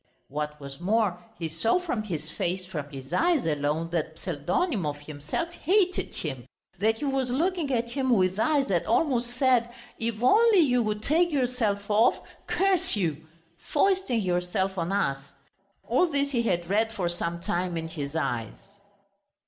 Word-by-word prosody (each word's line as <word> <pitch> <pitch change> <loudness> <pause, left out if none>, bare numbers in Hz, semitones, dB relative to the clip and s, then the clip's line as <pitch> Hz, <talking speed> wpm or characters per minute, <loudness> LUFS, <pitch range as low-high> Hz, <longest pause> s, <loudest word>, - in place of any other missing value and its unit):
What 150 +1 -4
was 140 0 -9
more, 190 -2 +1
he 165 - -3
saw 165 - +1
from 320 -11 -2
his 160 -7 -5
face, 180 +2 -2
from 155 -6 -5
his 135 -1 -9
eyes 335 -5 +2
alone, 155 +2 -1
that 160 -1 -2
Pseldonimov 175 - -1
himself 150 - -4
hated 370 +2 +1
him, 135 -6 -5 0.3
that 220 +3 +2
he 290 - -4
was 270 -2 0
looking 325 +3 0
at 235 -2 0
him 260 +1 -1
with 190 -4 +3
eyes 285 +2 +2
that 175 -3 +1
almost 245 -1 +2
said: 255 -3 +3 0.3
"If 230 0 -2
only 435 - +6
you 250 -5 +3
would 215 -1 -2
take 335 +6 +3
yourself 240 -7 0
off, 220 +3 +4 0.3
curse 375 - +2
you! 160 -5 -2 0.4
Foisting 380 - +2
yourself 180 +1 0
on 170 0 -2
us!" 140 -8 -1 0.5
All 260 +10 +3
this 280 -2 0
he 240 -4 +1
had 175 -7 0
read 220 +4 +1
for 195 -6 -2
some 170 0 -2
time 175 0 -2
in 165 0 -3
his 150 -2 -6
eyes. 125 - -4
205 Hz, 160 wpm, -27 LUFS, 165-260 Hz, 0.5 s, only